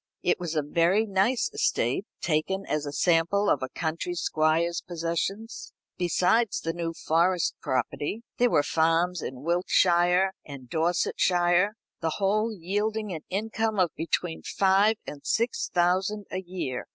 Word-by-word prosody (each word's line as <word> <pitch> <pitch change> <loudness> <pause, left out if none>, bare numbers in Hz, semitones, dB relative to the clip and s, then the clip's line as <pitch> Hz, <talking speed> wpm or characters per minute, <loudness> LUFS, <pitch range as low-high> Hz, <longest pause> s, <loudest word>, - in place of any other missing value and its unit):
It 175 - +2
was 170 -2 -4
a 150 - +1
very 170 +8 +2
nice 205 +5 +1
estate, 125 - 0
taken 175 +5 -1
as 150 -1 -2
a - - -3
sample 170 +6 +2
of - - +1
a 130 - -3
country 165 +3 -3
squire's 165 +1 +1
possessions. 175 +6 -4 0.2
Besides 185 +5 +1
the 165 - -2
New 165 -1 -3
Forest 170 +2 +2
property, 145 - -2 0.2
there 245 0 +4
were 145 - +3
farms 165 +3 +1
in 130 +1 -6
Wiltshire 175 +2 +3
and 140 -3 -10
Dorsetshire; 175 - +2 0.2
the 160 -1 -1
whole 215 +3 +1
yielding 210 +2 -2
an 160 - -5
income 220 +2 -1
of 180 -4 +2
between 165 +1 -2
five 195 +3 +3
and 145 - -8
six 230 - 0
thousand 185 +4 +1
a 185 - -3
year. 175 -9 -5
175 Hz, 140 wpm, -27 LUFS, 165-200 Hz, 0.2 s, there